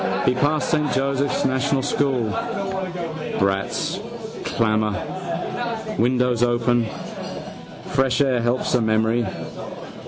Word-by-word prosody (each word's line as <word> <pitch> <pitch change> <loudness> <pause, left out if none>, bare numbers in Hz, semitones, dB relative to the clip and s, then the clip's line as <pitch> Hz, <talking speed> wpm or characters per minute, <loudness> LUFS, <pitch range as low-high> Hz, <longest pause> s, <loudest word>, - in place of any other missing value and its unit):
He - - +5
passed 145 +4 +1
Saint 150 -2 +2
Joseph's 140 +1 +1
National 130 +1 +2
school. 135 -5 +1 1.1
Brats' 95 0 0 0.5
clamour. 110 -2 +2 1.0
Windows 125 0 +3
open. 120 -1 +3 1.0
Fresh 135 0 +2
air 130 -4 +3
helps 120 +2 +1
memory. 110 +1 +2
125 Hz, 85 wpm, -23 LUFS, 115-135 Hz, 1.1 s, He